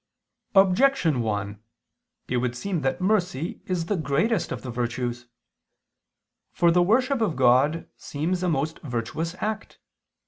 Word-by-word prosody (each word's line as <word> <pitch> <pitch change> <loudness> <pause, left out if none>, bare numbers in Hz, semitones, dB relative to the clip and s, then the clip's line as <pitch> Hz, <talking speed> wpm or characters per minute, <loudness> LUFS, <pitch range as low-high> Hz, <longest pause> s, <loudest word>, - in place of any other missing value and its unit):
Objection 190 - +4
1: 105 -2 -3 0.7
It 125 - -1
would 125 0 -1
seem 180 +3 -2
that 135 +6 -1
mercy 180 -6 0
is 180 -3 -1
the 205 - 0
greatest 170 - 0
of - - -5
the 125 - -5
virtues. 120 0 -3 1.2
For 170 -1 +3
the 175 +1 +4
worship 250 +7 +2
of 205 -8 +1
God 130 +6 +3
seems 170 +5 -2
a 180 - +1
most 155 0 -1
virtuous 150 +6 -4
act. 215 0 -4
160 Hz, 135 wpm, -25 LUFS, 125-185 Hz, 1.2 s, Objection